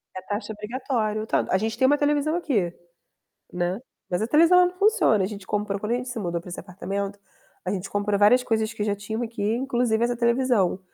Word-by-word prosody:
É 185 - -5
taxa 205 +3 -4
obrigatória, 215 -1 -2
o - - -5
tanto - - 0
a 190 - +4
gente 220 +3 -2
tem 260 - +4
uma 290 - +4
televisão 295 +2 +1
aqui, 220 - 0 0.8
né. 180 +4 -1 0.3
Mas 175 +3 0
a 220 - +1
televisão 335 +6 +6
não 360 - -3
funciona. 410 - +3
A 185 - +1
gente 200 -2 -8
comprou 205 -1 -1
quando 210 +3 -3
a - - +3
gente 250 +1 -5
se 245 -2 -5
mudou 170 -4 -2
para 175 - -13
esse 175 - -7
apartamento, 200 +2 -5 0.4
a 185 - -2
gente 195 0 -4
comprou 205 0 0
várias 235 +5 +5
coisas 220 -2 0
que 215 -2 -5
já 205 -1 0
tinham 220 +3 -4
aqui, 230 -3 -5
inclusive 235 0 0
essa 240 0 +1
televisão. 235 -6 +2
220 Hz, 220 wpm, -25 LUFS, 200-250 Hz, 0.8 s, televisão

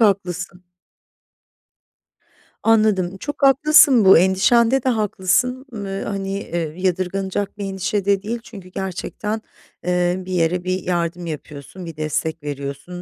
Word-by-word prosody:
haklısın. 185 -3 0 2.0
Anladım, 210 -5 +2
çok 290 +5 -6
haklısın 275 -4 +6
bu 190 - +9
endişende 230 +8 +3
de 260 - +2
haklısın, 225 +4 0
ııı, 195 -2 -4
hani, 195 -1 -3
eee, 165 -5 -4
yadırganacak 190 +2 -2
bir 205 - -5
endişe 195 +1 -2
de 200 -1 +2
değil, 230 +3 -4
çünkü 195 -6 -11
gerçekten, 195 +3 -4 0.4
eee, 180 0 +1
bir 185 - -7
yere 175 0 +1
bir 185 0 -2
yardım 175 0 -2
yapıyorsun, 155 +2 -8
bir 165 - -8
destek 155 +1 -2
veriyorsun, 140 +5 -6
190 Hz, 125 wpm, -21 LUFS, 175-210 Hz, 2.0 s, bu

